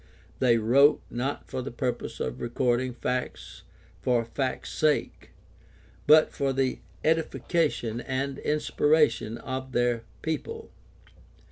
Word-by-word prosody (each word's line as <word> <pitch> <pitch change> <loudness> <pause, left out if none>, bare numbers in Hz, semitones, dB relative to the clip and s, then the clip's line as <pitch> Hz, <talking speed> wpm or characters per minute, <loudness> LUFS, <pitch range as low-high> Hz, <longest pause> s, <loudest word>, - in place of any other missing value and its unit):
They 120 -3 +4
wrote, 130 +7 +5
not 130 +4 -3
for 130 -1 -4
the 135 - -5
purpose 125 0 -3
of - - -3
recording 120 +1 0
facts 125 +1 -4 0.4
for 120 -2 +1
fact's 130 +3 -3
sake, 155 -1 0 0.8
but 155 +1 +7
for 140 -1 -1
the 130 -1 0 0.2
edification 155 -6 0
and 135 +1 -3
inspiration 145 -6 +2
of 130 0 -5
their 120 -1 +1 0.2
people. 450 - -4
130 Hz, 110 wpm, -27 LUFS, 120-145 Hz, 0.8 s, but